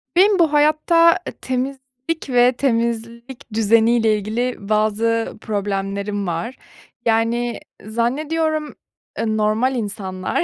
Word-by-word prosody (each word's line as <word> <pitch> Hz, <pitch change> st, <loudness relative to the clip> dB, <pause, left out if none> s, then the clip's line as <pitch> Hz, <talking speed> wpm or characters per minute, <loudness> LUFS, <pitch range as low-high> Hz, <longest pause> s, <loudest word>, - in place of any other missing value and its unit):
Benim 390 Hz, +2 st, +5 dB
bu 320 Hz, -3 st, +3 dB
hayatta 320 Hz, +4 st, +4 dB, 0.2 s
temizlik 260 Hz, +3 st, -4 dB
ve 245 Hz, 0 st, +5 dB
temizlik 235 Hz, 0 st, -3 dB
düzeniyle 225 Hz, +1 st, +3 dB
ilgili 230 Hz, +5 st, -2 dB
bazı 220 Hz, +2 st, 0 dB
problemlerim 200 Hz, -1 st, -3 dB
var. 175 Hz, +9 st, -3 dB, 0.5 s
Yani, 230 Hz, +1 st, +1 dB, 0.3 s
zannediyorum, 300 Hz, +7 st, -1 dB, 0.4 s
eee, 220 Hz, -1 st, -1 dB
normal 220 Hz, +5 st, +1 dB
insanlar, 200 Hz, -, -3 dB
235 Hz, 90 wpm, -20 LUFS, 215-270 Hz, 0.5 s, Benim